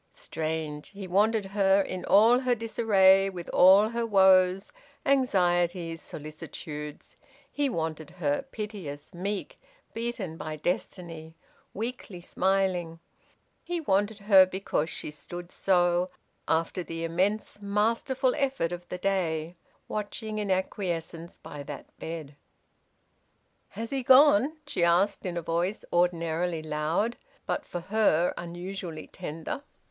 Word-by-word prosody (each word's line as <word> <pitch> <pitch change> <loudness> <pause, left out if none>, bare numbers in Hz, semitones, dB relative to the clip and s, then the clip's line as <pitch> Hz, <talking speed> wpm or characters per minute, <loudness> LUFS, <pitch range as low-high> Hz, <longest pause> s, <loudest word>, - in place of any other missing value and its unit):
Strange: 155 -2 -4
he 195 -1 -8
wanted 210 +3 +2
her 195 0 +3
in 185 -2 -3
all 225 +5 +6
her 255 -2 +1
disarray, 195 -4 +4
with 175 -3 -7
all 195 +4 +6
her 235 0 -2
woes, 190 -3 +4 0.3
anxieties, 175 - +1
solicitudes; 150 0 -8 0.4
he 285 -1 0
wanted 160 - -3
her, 145 -5 -1
piteous, 195 -9 -6
meek, 200 - -4 0.3
beaten 225 -8 -4
by 155 -1 -5
destiny, 165 0 -4 0.4
weakly 220 -4 -5
smiling; 180 -2 0 0.6
he 350 0 -3
wanted 205 -6 +1
her 200 -2 +7
because 185 -4 -2
she - - -5
stood 175 +4 -9
so, 175 -1 +2 0.4
after 165 +3 0
the 165 0 -5
immense, 195 +5 -1
masterful 230 +6 +1
effort 270 - 0
of 175 0 -7
the 180 - -4
day, 175 -4 -1 0.3
watching 215 +1 -4
in 205 -1 -2
acquiescence 175 -3 -3
by 145 - -9
that 140 0 -9
bed! 160 -3 -6 1.4
"Has 225 +1 -4
he 270 -1 -1
gone?" 290 +3 +6
she 170 - -1
asked, 185 +4 +2
in 175 -1 -3
a 170 - -3
voice 170 +6 -1
ordinarily 170 -1 +1
loud, 155 +9 -1 0.3
but, - - -2
for 175 - -5
her, 180 -4 +2
unusually 175 -1 -6
tender. 160 - -6
185 Hz, 120 wpm, -28 LUFS, 165-210 Hz, 1.4 s, her